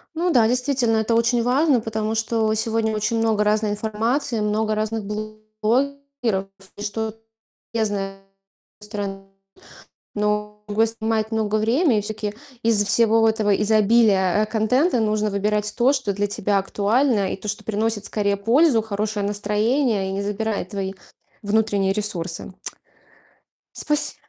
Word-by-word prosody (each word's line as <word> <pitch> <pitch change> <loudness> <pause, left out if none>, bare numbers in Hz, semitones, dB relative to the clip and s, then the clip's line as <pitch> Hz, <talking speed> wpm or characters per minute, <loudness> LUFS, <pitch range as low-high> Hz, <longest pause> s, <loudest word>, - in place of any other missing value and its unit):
Ну 345 +2 +1
да, 240 -7 +4
действительно, 250 -1 +1
это 220 +1 +1
очень 235 +1 +2
важно, 260 +1 +3
потому 220 0 -2
что 220 0 0
сегодня 220 0 0
очень 215 +2 0
много 220 -2 +2
разной 210 0 +1
информации, 225 +4 -1
много 215 +1 0
разных 215 0 -2
блогеров, 215 +2 -2 0.3
и - - -8
что 215 +1 -3 0.6
Я 225 -1 +1
знаю 195 -2 -4 0.6
стороны 200 -2 -6 0.9
но 210 0 -2
го 210 +1 -2
отнимает 220 -1 -1
много 215 -1 0
времени, 230 +4 +2
и 210 - -1
все-таки 210 0 -4 0.3
из-за 220 -3 +4
всего 225 +1 +3
вот 225 - +4
этого 210 -2 +2
изобилия, 210 -2 +3
э, - - 0
контента 245 +8 +1
нужно 215 -1 0
выбирать 210 +1 0
то, 250 +3 +4
что 260 -8 -1
для 205 +1 -1
тебя 205 0 0
актуально 205 +2 +1
и - - -3
то, 195 - -9
что 205 - -3
приносит 220 -1 -1
скорее 200 -1 0
пользу, 235 +4 +3
хорошее 210 -1 -2
настроение 210 +1 0
и - - -3
не 195 +1 -2
забирает 205 -1 -3
твои 195 -2 -4 0.5
внутренние 205 -2 +1
ресурсы. 185 -4 -2 1.2
Спаси 300 0 0
215 Hz, 140 wpm, -22 LUFS, 205-230 Hz, 1.2 s, да